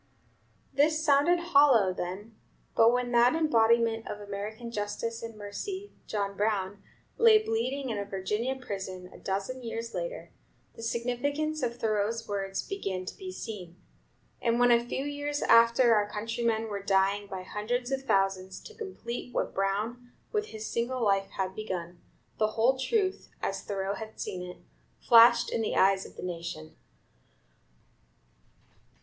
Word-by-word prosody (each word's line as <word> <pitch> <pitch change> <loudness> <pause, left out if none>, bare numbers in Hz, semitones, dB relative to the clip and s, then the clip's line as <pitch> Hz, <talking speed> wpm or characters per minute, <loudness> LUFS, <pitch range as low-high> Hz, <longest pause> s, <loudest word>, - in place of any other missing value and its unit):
This 310 +2 +2
sounded 295 +4 +5 0.2
hollow 250 -10 +6
then, 190 +5 -6 0.4
but 225 +1 +6
when 245 0 0
that 240 +4 +5
embodiment 230 -7 +3
of 205 - -5
American 210 +3 -6
justice 225 +2 -3
and 230 -1 -7
mercy, 375 - -6 0.2
John 200 -2 -2
Brown, 205 -1 -1 0.4
lay 455 -1 +8
bleeding 260 - -1
in 210 - -2
a 200 - -3
Virginia 210 +6 -2
prison, 190 -7 -6
a - - -13
dozen 200 +7 -3
years 230 -1 -5
later, - - -5 0.4
the - - -11
significance 285 +7 -1
of 235 -1 -2
Thoreau's 220 0 -1
words 195 -1 -3
began 195 - -3
to - - -6
be 375 -1 -7
seen; 190 - -7 0.7
and 235 0 +1
when 245 0 +5
a 235 0 +5
few 265 +3 -3
years 290 0 -3
after 235 +1 +6
our 205 -1 +2
countrymen 225 +1 -1
were 200 -2 -4
dying 195 +1 +2
by 190 -2 -6
hundreds 245 +6 -3
of 270 0 0
thousands 195 -6 0
to 445 - -12
complete 315 - -6
what - - -2
Brown, 215 +6 -2 0.2
with 425 -1 -1
his 220 0 -7
single 240 +2 -1
life, 195 -2 +2
had 190 -1 -1
begun, 180 -4 -5 0.4
the 215 - +4
whole 240 +4 +3
truth, 385 - 0
as - - -2
Thoreau 195 -1 -2
had 220 +1 -8
seen 180 - -4
it, 180 0 -8 0.4
flashed 235 0 +6
in 230 - 0
the 220 - -1
eyes 190 0 +3
of - - -17
the - - -8
nation. 170 - -6
225 Hz, 150 wpm, -29 LUFS, 200-250 Hz, 0.7 s, lay